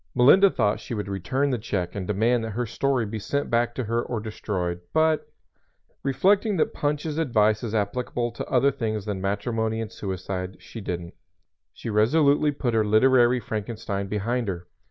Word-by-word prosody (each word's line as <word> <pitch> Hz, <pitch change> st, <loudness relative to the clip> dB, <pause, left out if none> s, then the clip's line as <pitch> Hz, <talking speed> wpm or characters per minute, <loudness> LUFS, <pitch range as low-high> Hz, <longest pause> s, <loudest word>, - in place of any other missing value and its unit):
Melinda 165 Hz, +11 st, +7 dB
thought 105 Hz, -, +1 dB
she 120 Hz, -, -6 dB
would 105 Hz, -2 st, -3 dB
return 130 Hz, +9 st, -1 dB
the 125 Hz, -, -1 dB
check 95 Hz, -5 st, -3 dB
and 95 Hz, -3 st, -4 dB
demand 115 Hz, +4 st, +2 dB
that 110 Hz, -1 st, -4 dB
her 125 Hz, -, 0 dB
story 130 Hz, +1 st, 0 dB
be 110 Hz, +1 st, -5 dB
sent 140 Hz, +7 st, -2 dB
back 120 Hz, 0 st, +1 dB
to 130 Hz, -, -2 dB
her 115 Hz, +1 st, 0 dB
or 120 Hz, -1 st, -3 dB
destroyed; 95 Hz, -5 st, -3 dB
but, 160 Hz, 0 st, +2 dB, 0.7 s
reflecting 195 Hz, -, +2 dB
that -, -, +1 dB
Punch's 150 Hz, +1 st, -1 dB
advice 110 Hz, -8 st, +2 dB
is 115 Hz, -2 st, -3 dB
applicable 120 Hz, +3 st, -1 dB
to 115 Hz, -, -6 dB
other 135 Hz, +2 st, +3 dB
things 110 Hz, -6 st, -3 dB
than 100 Hz, -3 st, -3 dB
matrimony 110 Hz, +3 st, -1 dB
and 115 Hz, -1 st, -4 dB
suicide, 95 Hz, -1 st, -5 dB
she 115 Hz, -, -9 dB
didn't. 85 Hz, -3 st, -5 dB, 0.6 s
She 115 Hz, -, -6 dB
resolutely 145 Hz, +7 st, +3 dB
put 130 Hz, -4 st, -2 dB
her 110 Hz, -1 st, +3 dB
literary 120 Hz, +3 st, +4 dB
Frankenstein 105 Hz, -3 st, -4 dB
behind 115 Hz, +4 st, -1 dB
her. 90 Hz, -2 st, -4 dB
115 Hz, 175 wpm, -25 LUFS, 105-130 Hz, 0.7 s, Melinda